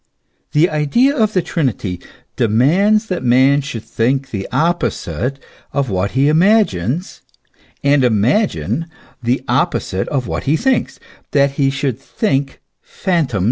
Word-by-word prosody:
The 155 +3 +4
idea 185 - +2
of 215 -5 +1
the 185 - +1
Trinity 115 - -2 0.4
demands 170 - +3
that 185 -5 -3
man 130 +3 +4
should 130 -6 -6
think 130 +3 -1
the 100 -3 -4
opposite 140 -3 -1 0.4
of 140 -5 -1
what 95 +1 -1
he 140 +2 +4
imagines, 165 - +1 0.6
and 140 -1 +3
imagine 130 - +1 0.3
the 120 +2 0
opposite 95 +1 0
of 135 -4 -2
what - - -4
he 150 +4 +2
thinks, 260 +2 0 0.3
that 140 -1 +3
he 135 0 +1
should 135 -3 -2
think 135 - -2 0.2
phantoms 170 -9 -2
realities. 100 - 0
140 Hz, 135 wpm, -17 LUFS, 125-175 Hz, 0.6 s, The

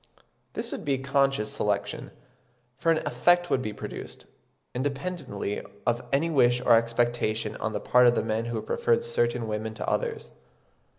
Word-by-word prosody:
This - - -4
would - - -5
be 140 -2 +1
unconscious 135 -4 +1
selection, 105 +8 -2 0.7
for 165 +5 +2
an 160 - +1
effect 175 0 +3
would 130 - +2
be 110 - -3
produced, - - -8 0.5
independently 140 - -3 0.2
of 120 +1 +1
any 140 +4 +2
wish 125 -6 +4
or 125 - +4
expectation 115 -2 +1
on 110 - -3
the - - -1
part 125 0 +5
of 120 - +5
the - - +1
men 110 +1 -1
who 120 0 -2
preferred 475 -1 +1
certain 120 - 0
women 110 +1 -3
to - - -4
others. - - -2
125 Hz, 160 wpm, -27 LUFS, 110-145 Hz, 0.7 s, part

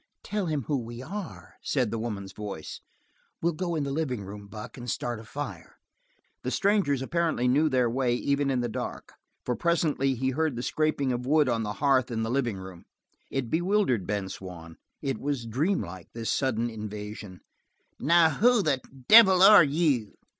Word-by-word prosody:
"Tell 210 -3 -2
him 150 -4 -1
who 140 +3 -1
we 120 +1 -7
are," 195 +4 -8
said 130 -6 0
the 115 - -2
woman's 100 -4 -5
voice. 100 -7 -7 0.6
"We'll 170 +1 0
go 175 +1 -2
to 155 - 0
the 140 - -3
living 135 -7 -2
room, 100 +1 -9
Buck, 105 +1 -9
and 120 -1 -7
start 120 +3 -3
a - - -10
fire." 145 +6 -7 0.6
The - - -3
strangers 195 -10 +1
apparently 165 -4 0
knew 145 +5 +3
their 130 -3 +2
way 120 0 0
even 140 +2 0
in 130 -2 +1
the 120 - -1
dark, 110 - -6 0.3
for 125 - 0
presently 155 -5 +1
he 130 +2 -1
heard 155 0 0
the 120 - -4
scraping 155 -3 0
of 125 0 -3
wood 150 0 +4
on 115 -2 +1
the 105 -1 -3
hearth 130 +1 +2
in 115 -2 -2
the 110 - -2
living 120 -6 0
room. 95 -2 -10 0.4
It 130 -4 -3
bewildered 175 - +1
Ben 100 -2 -2
Swann. 90 -3 -9 0.3
It 135 -2 -2
was 140 -4 -2
dream 145 - 0
like, 85 0 -9
this 115 -1 -3
sudden 120 -4 0
invasion. 105 -3 -7 0.6
"Now, 165 +3 +5
who 235 +5 +3
the 140 -5 +1 0.3
devil 190 -5 +8
are 205 -3 +9
you?" 145 -7 0
130 Hz, 180 wpm, -27 LUFS, 110-155 Hz, 0.6 s, are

